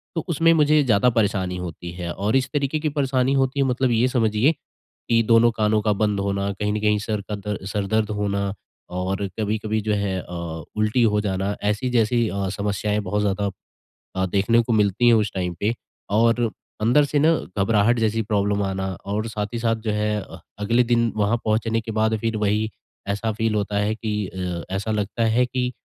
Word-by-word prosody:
तो, 165 - 0
उसमें 165 0 +3
मुझे 150 -1 +4
ज़्यादा 125 -1 +3
परेशानी 95 -4 +1
होती 85 -1 -6
है 85 -1 -5
और 105 +5 -1
इस 135 0 +2
तरीके 145 +1 0
की 155 - -1
परेशानी 135 -2 +1
होती 135 0 +1
है, 135 - +3
मतलब 125 0 +1
ये 115 +2 +3
समझिए, 115 +1 +2 0.6
कि 115 -1 +4
दोनों 115 0 +6
कानों 110 -1 +1
का 105 0 +2
बंद 105 -1 0
होना, 100 0 -1
कहीं 105 +1 -2
न 105 - -1
कहीं 105 -1 +2
सर 105 0 -2
का 105 - -2
दर्द 105 -1 -5
सर 100 0 -2
दर्द 110 -1 +2
होना 100 -1 -1 0.4
और 95 +2 -1
कभी-कभी 110 0 -1
जो 105 0 0
है 100 -2 -1
अ, 85 -2 -6
उल्टी 110 +3 +2
हो 105 -2 +3
जाना, 100 0 -1
ऐसी 105 +5 0
जैसी 120 -1 +2
अ, 100 -1 -2
समस्याएंँ 105 +1 -1
बहुत 105 +3 -1
ज़्यादा 100 0 0 0.7
अ, 95 0 +1
देखने 100 +5 +2
को 115 - -2
मिलती 105 +2 +2
है 120 - +7
उस 110 -2 +1
टाइम 90 -2 -2
पे। 110 +3 +1 0.4
और 115 +3 +3 0.4
अंदर 125 +7 +4
से 145 +1 0
ना 160 +3 +4 0.2
घबराहट 105 +3 +3
जैसी 110 0 +1
प्रॉब्लम 100 -1 0
आना 95 0 -2 0.2
और 105 +2 -2
साथ 105 -2 -3
ही - - -1
साथ 115 -1 +1
जो - - +1
है 105 0 0
अ, - - -11 0.2
अगले 115 +4 +2
दिन 115 -1 +2
वहाँ 105 +2 +2
पहुँचने 115 +1 +1
के 110 - -7
बाद 110 0 +2
फिर 115 0 -1
वही 105 +1 0 0.4
ऐसा 105 +3 -1
फ़ील 110 0 -1
होता 105 0 -1
है 105 +1 0
कि 110 -1 -3
अ, 90 -2 -4
ऐसा 100 +3 -2
लगता 105 +1 -1
है 115 +3 +3
कि, 125 0 -2
105 Hz, 200 wpm, -23 LUFS, 100-115 Hz, 0.7 s, है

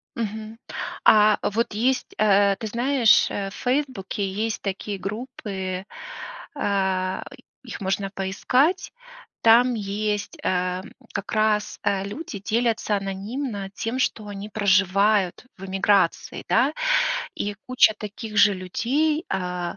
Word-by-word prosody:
Мгм. 220 0 -5 0.5
А 210 -1 +6
вот 220 +1 0
есть, 250 +4 0
э, 200 -1 +4
ты 220 - -5
знаешь, 240 +1 +4
э, 195 -1 -3
в - - -13
"Фейсбуке" 245 -7 -1
есть 215 +3 -2
такие 200 +1 -4
группы,- 195 -4 -5 0.7
а, 190 -5 0 0.4
их 240 - -8
можно 195 0 -1
поискать,- 255 - +1 0.5
там 240 +2 +6
есть, 210 0 -2
э, 180 0 0 0.3
как 200 0 -4
раз, 215 -1 +1
э, 195 -1 +1
люди 210 0 -6
делятся 220 0 0
анонимно 200 +2 -4
тем, 230 +5 -3
что 215 -4 -1
они 205 +1 -7
проживают 200 0 +2
в 195 - -8
эмиграции, 195 -1 +1
да. 280 +5 +3 0.6
И 205 0 -3
куча 255 -4 +5
таких 215 +1 -7
же 205 -1 +6
людей, 280 - 0
а, 180 -2 -3
205 Hz, 120 wpm, -24 LUFS, 195-230 Hz, 0.7 s, А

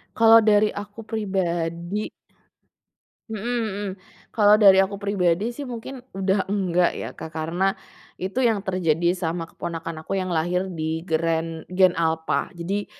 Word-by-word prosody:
Kalau 225 0 +7
dari 215 -1 +4
aku 205 +2 -8
pribadi 190 -3 -2 1.2
Mhm 215 -2 -5
mhm, 220 -4 -2 0.5
kalau 210 -1 +6
dari 200 -3 +7
aku 200 +1 -8
pribadi 200 0 +1
sih 280 +4 -6
mungkin 245 +1 -7 0.2
udah 195 0 0
enggak 185 -3 +1
ya - - -4
Kak 160 - -8
karena, 170 +5 0 0.5
itu 190 +5 -4
yang 220 -4 +2
terjadi 175 -2 +1
sama 165 -1 -3
keponakan 165 -1 -6
aku - - -3
yang 185 - -3
lahir 175 +2 0 0.2
di 160 +1 -2
gren 165 0 -1
gen 185 -1 +4
alpha 160 +3 0
jadi, 190 +4 -3
190 Hz, 140 wpm, -24 LUFS, 165-205 Hz, 1.2 s, Kalau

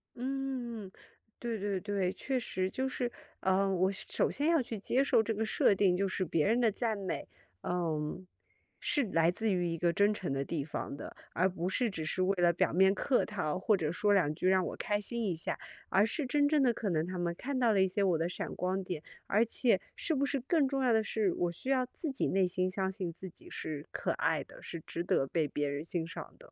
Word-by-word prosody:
嗯， 250 -5 -3 0.5
对 235 -2 -2
对 200 -1 -1
对， 195 -1 0
确 265 +4 -2
实 185 -5 -1
就 265 +5 -1
是， 250 -1 -2 0.3
呃， 190 +1 +2
我 185 +1 +3
是 195 - -7
首 - - +1
先 295 +4 0
要 330 -5 +4
去 230 -2 -5
接 245 +6 +1
受 225 -5 +4
这 225 - -1
个 220 +1 -1
设 215 - +4
定 190 -2 +3
就 195 +1 +1
是 185 0 -1
别 155 -2 +1
人 230 +4 +3
的 235 -2 +4
赞 220 0 -1
美， 190 -2 -3 0.4
嗯， 170 0 -2 0.5
是 290 - +2
来 165 +1 +4
自 220 +4 -1
于 180 -2 +1
一 165 - -2
个 170 +1 +2
真 205 +3 +4
诚 185 -9 -3
的 135 - 0
地 145 -1 -3
方 150 -2 -4
的， - - -8 0.2
而 185 +2 +3
不 180 0 -2
是 240 +4 +1
只 170 -6 -4
是 170 +4 -1
为 195 +1 +2
了 175 - +6
表 170 - +1
面 190 +2 +5
客 250 +6 +2
套， 180 -6 -2
或 210 +2 +3
者 160 -4 -1
说 205 +5 +2
两 155 -6 +3
句 185 +2 +1
让 190 -1 +4
我 - - -4
开 205 0 0
心 235 +3 -2
一 190 -5 +1
下， 165 - -2 0.3
而 195 +2 +4
是 295 +6 -2
真 285 +3 +2
正 300 -2 +3
的 245 -3 +4
可 220 -3 -2
能 160 -2 +1
他 185 - -4
们 175 -1 -1
看 275 +1 -3
到 240 -3 +4
了 195 - +4
一 190 - +5
些 200 +2 0
我 180 -4 +3
的 165 +1 0
闪 180 - -4
光 185 +1 -1
点， 180 -4 -4 0.3
而 220 +3 +3
且 230 -3 +2 0.2
是 325 - -1
不 280 -1 +2
是 280 -1 -1
更 285 +2 +2
重 270 0 -1
要 250 - +4
的 220 -1 +4
是， 215 -2 0
我 175 - 0
需 255 +10 -5
要 260 -2 +3
自 285 +4 -4
己 265 - 0
内 190 -1 +3
心 185 +1 0
相 190 0 -1
信 185 -3 -4
自 185 +3 -8
己 - - -13
是 150 -2 -5
可 - - -1
爱 - - +1
的， - - -15
是 170 - -7
值 170 - -4
得 135 - +2
被 155 +2 0
别 145 -1 -1
人 140 0 -3
欣 170 +1 -2
赏 165 - -8
的。 - - -17
195 Hz, 265 characters per minute, -32 LUFS, 175-235 Hz, 0.5 s, 了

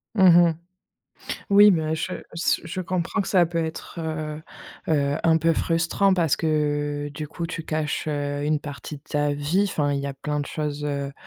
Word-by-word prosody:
Mmh 190 -2 +6
mh. 170 -1 +6 1.0
Oui, 205 +1 +8
mais 160 -4 +1
je 160 - -3 0.2
se 170 - +1
je 175 +3 -4
comprends 180 0 -1
que 195 - -2
ça 180 -3 +5
peut 170 0 -1
être, 160 +2 -7
heu 155 -1 -4 0.5
heu, 145 -2 +2
un 165 -1 +4
peu 165 +1 +3
frustrant 170 +4 +2
parce 165 -6 +2
que 145 -2 -1
du 150 0 -6
coup, 170 +1 -4
tu 165 -1 -6
caches, 155 -1 -2
heu, 145 -1 -2
une 150 0 +1
partie 145 0 -7
de 140 - -16
ta 145 0 0
vie. 150 +8 +1
Enfin, 145 -4 0
il 140 - -1
y 140 - -4
a 140 - -4
plein 150 +2 -3
de 145 - -4
choses, 150 -1 -4
heu 140 -1 -3
155 Hz, 195 wpm, -24 LUFS, 145-165 Hz, 1.0 s, Oui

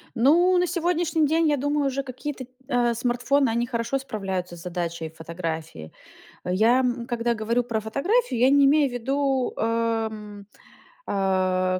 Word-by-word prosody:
Ну, 340 +10 +4
на 360 0 +2
сегодняшний 340 -2 +1
день, 325 +2 +2
я 295 - +2
думаю, 290 +1 0
уже 275 +1 -2
какие-то, 260 +1 -6
т 250 - -33 0.2
э, 245 -3 +1
смартфоны, 245 +3 +1
они 235 +1 0
хорошо 235 +2 -1
справляются 190 -8 -4
с - - -11
задачей 170 -2 -4
фотографии. 160 - -6 0.5
Я, 220 +8 +3
м, 245 -2 -1
когда 240 -1 0
говорю 230 +3 0
про 230 -2 -2
фотографию, 275 - 0
я 255 +2 +5
не 280 0 +5
имею 285 0 +4
ввиду, 265 +1 -1
э, - - -3 0.5
м, 210 -2 -10 0.6
э, 185 -1 +1
240 Hz, 155 wpm, -24 LUFS, 195-280 Hz, 0.6 s, я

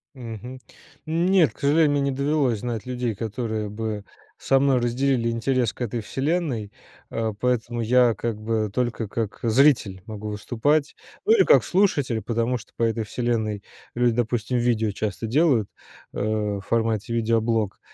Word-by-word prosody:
Мгм. 125 +1 -8 0.5
Нет, 170 +2 +3
к - - -24
сожалению, 150 +2 +3
мне 145 0 +1
не 140 0 +1
довелось 140 -4 +1
знать 115 -1 -4
людей, 125 -3 -2
которые 110 0 -3
бы 105 -1 -4 0.3
со 135 - +2
мной 135 -2 +3
разделили 120 0 +1
интерес 115 0 0
к - - -15
"Этой 120 -1 -2
вселенной", 135 - -2 0.4
а, 115 -1 -1
поэтому 120 -1 0
я 120 0 +4
как 110 +1 -3
бы 110 -1 -1
только 120 -2 -1
как 110 0 -4
зритель 115 -5 +3
могу 105 -1 -6
выступать, 130 +8 0 0.3
ну 435 - +5
или 450 - +6
как 480 - +5
слушатель, 145 - +1
потому 115 +2 0
что 115 - -15
по - - -7
"Этой 115 0 +1
вселенной" 110 -2 -2 0.3
люди, 120 -1 +2
допустим, 120 0 0
видео 120 -2 +1
часто 105 +2 -3
делают, 130 - +2 0.4
э, - - -5
в 105 -1 -1
формате 115 +1 -1
видеоблог, 115 -2 0
115 Hz, 155 wpm, -24 LUFS, 110-130 Hz, 0.5 s, или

